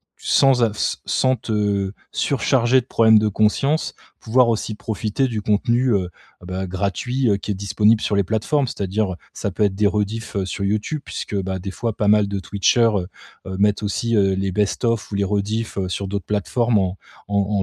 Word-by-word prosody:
sans 135 Hz, -3 st, +3 dB
av 115 Hz, -, +2 dB
s -, -, -1 dB
sans 130 Hz, 0 st, +2 dB
te 105 Hz, -4 st, -1 dB, 0.2 s
surcharger 130 Hz, -1 st, +2 dB
de 125 Hz, -, -7 dB
problèmes 110 Hz, -3 st, +5 dB
de 110 Hz, -, +1 dB
conscience. 110 Hz, +9 st, +1 dB, 0.3 s
Pouvoir 120 Hz, +2 st, +3 dB
aussi 115 Hz, -1 st, -1 dB
profiter 110 Hz, +4 st, -2 dB
du 110 Hz, -4 st, -3 dB
contenu, 120 Hz, +5 st, +1 dB
heu, 95 Hz, -3 st, 0 dB, 0.3 s
bah, 90 Hz, +1 st, -5 dB
gratuit, 100 Hz, +8 st, -1 dB
heu, 100 Hz, -, +3 dB
qui 100 Hz, +1 st, -4 dB
est -, -, +1 dB
disponible 105 Hz, +3 st, +2 dB
sur 105 Hz, -, -1 dB
les 100 Hz, -, +3 dB
plateformes. 110 Hz, -, 0 dB
C'est-à-dire, 100 Hz, -2 st, -2 dB
heu, -, -, -7 dB, 0.2 s
ça 100 Hz, -, -3 dB
peut 100 Hz, -, -1 dB
être 100 Hz, -2 st, +1 dB
des 105 Hz, +1 st, +1 dB
rediffs, 105 Hz, +1 st, -1 dB
heu, 95 Hz, -, 0 dB
sur 100 Hz, +1 st, -4 dB
YouTube 105 Hz, +9 st, -1 dB
puisque, 105 Hz, -, -5 dB
bah, 95 Hz, 0 st, -3 dB
des 95 Hz, +1 st, -5 dB
fois 115 Hz, +2 st, -2 dB
pas 105 Hz, -, 0 dB
mal 105 Hz, -1 st, +4 dB
de 100 Hz, -1 st, -2 dB
Twitcher, 100 Hz, +5 st, +2 dB
heu 90 Hz, -2 st, -1 dB, 0.4 s
heu, 95 Hz, 0 st, -5 dB
mettent 105 Hz, +1 st, +2 dB
aussi, 115 Hz, +3 st, -1 dB
heu, 95 Hz, -2 st, +3 dB
les 95 Hz, -1 st, -2 dB
best 105 Hz, +4 st, 0 dB
of 115 Hz, -2 st, -1 dB
ou -, -, -3 dB
les 100 Hz, 0 st, +1 dB
rediffs, 105 Hz, +3 st, -2 dB
heu, 95 Hz, -2 st, -1 dB
sur 95 Hz, +3 st, -3 dB
d'autres 100 Hz, 0 st, -3 dB
plateformes 110 Hz, +3 st, +1 dB
en 95 Hz, 0 st, -1 dB, 0.3 s
en 100 Hz, -, -3 dB
en 100 Hz, 0 st, +1 dB
105 Hz, 210 wpm, -21 LUFS, 100-115 Hz, 0.4 s, problèmes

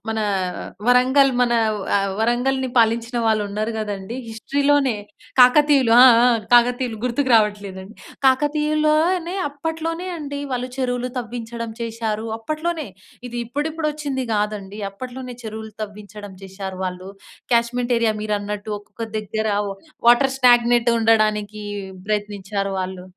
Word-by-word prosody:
మన 220 Hz, 0 st, -1 dB, 0.7 s
వరంగల్ 260 Hz, +2 st, +5 dB
మన 245 Hz, -1 st, +3 dB, 0.4 s
ఆహ్, 195 Hz, -1 st, 0 dB
వరంగల్ని 255 Hz, +3 st, +1 dB
పాలించిన 230 Hz, +1 st, +2 dB
వాళ్ళు 220 Hz, -1 st, +2 dB
ఉన్నారు 215 Hz, +3 st, -2 dB
గదండీ 205 Hz, +1 st, -4 dB
హిస్టరీ 225 Hz, +6 st, -3 dB
లోనే 275 Hz, -5 st, +3 dB, 0.5 s
కాకతీయులు, 265 Hz, -1 st, +5 dB
ఆ! 260 Hz, -, +10 dB, 0.2 s
ఆ! -, -, +6 dB, 0.2 s
కాకతీయులు 245 Hz, -1 st, +3 dB
గుర్తుకు 255 Hz, +2 st, 0 dB
రావట్లేదండి 205 Hz, -2 st, 0 dB, 0.3 s
కాకతీయుల్లోనే 305 Hz, +5 st, +2 dB
అప్పట్లోనే 325 Hz, +4 st, -4 dB
అండి 285 Hz, -2 st, -5 dB
వాళ్ళు 250 Hz, 0 st, -2 dB
చెరువులు 250 Hz, -1 st, -1 dB
తవ్వించడం 230 Hz, -1 st, -5 dB
చేశారు 225 Hz, -1 st, -3 dB
అప్పట్లోనే, 310 Hz, +5 st, -3 dB, 0.4 s
ఇది 240 Hz, -, -7 dB
ఇప్పుడిప్పుడు 305 Hz, +5 st, -2 dB
వచ్చింది 280 Hz, -4 st, -3 dB
కాదండి, 210 Hz, -1 st, -3 dB
అప్పట్లోనే 250 Hz, +4 st, -8 dB
చెరువులు 220 Hz, 0 st, -7 dB
తవ్వించడం 205 Hz, -1 st, -9 dB
చేశారు 190 Hz, -1 st, -7 dB
వాళ్ళు. 185 Hz, +1 st, -5 dB, 0.4 s
క్యాష్మెంట్ 240 Hz, +1 st, +1 dB
ఏరియా 225 Hz, -2 st, +1 dB
మీరన్నట్టు 210 Hz, 0 st, -3 dB
ఒక్కొక్క 205 Hz, +2 st, -11 dB, 0.2 s
దగ్గర 220 Hz, +1 st, -3 dB, 0.2 s
వ్ -, -, -3 dB, 0.4 s
వాటర్ 265 Hz, +2 st, +5 dB
స్టాగ్నెట్ 240 Hz, -1 st, +4 dB
ఉండడానికి, 215 Hz, -2 st, +1 dB, 0.5 s
ప్రయత్నించారు 205 Hz, -1 st, -2 dB
వాళ్ళు. 185 Hz, 0 st, -5 dB
235 Hz, 115 wpm, -21 LUFS, 210-265 Hz, 0.7 s, ఆ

